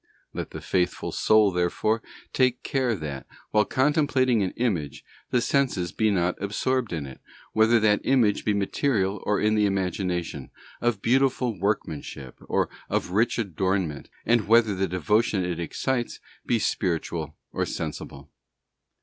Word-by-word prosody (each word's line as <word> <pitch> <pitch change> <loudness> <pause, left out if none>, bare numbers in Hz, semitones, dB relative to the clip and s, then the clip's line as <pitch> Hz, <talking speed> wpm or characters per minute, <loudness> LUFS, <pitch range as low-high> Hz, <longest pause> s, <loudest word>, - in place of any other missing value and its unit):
Let - - -4
the - - -8
faithful 90 -1 -1
soul, 110 -2 +4
therefore, 90 +5 0 0.3
take 130 -1 +2
care 130 -5 0
that, 75 -6 -6 0.2
while 105 0 +4
contemplating 130 -4 +2
an 95 - +1
image, 95 - -2 0.2
the 125 - +2
senses 120 -11 0
be 110 +4 +1
not 90 -3 0
absorbed 115 +4 -1
in 80 -4 -3
it, 65 -1 -11 0.3
whether 110 +2 +5
that 105 -1 +3
image 120 -6 +3
be 105 - +1
material 100 -1 0
or 105 - +2
in 105 0 +2
the 105 -1 +3
imagination, 90 -6 -2 0.3
of 120 -4 0
beautiful 125 -1 +2
workmanship 80 - -3
or - - +2 0.2
of - - -1
rich 110 +5 +2
adornment, 95 - -1 0.2
and 120 -3 +2
whether 115 -1 +5
the 95 0 0
devotion 95 +2 +1
it 90 -2 -3
excites 120 +8 -2 0.3
be 120 - +3
spiritual 85 -6 -2 0.2
or - - -1
sensible. 70 0 -6
105 Hz, 140 wpm, -26 LUFS, 90-120 Hz, 0.3 s, whether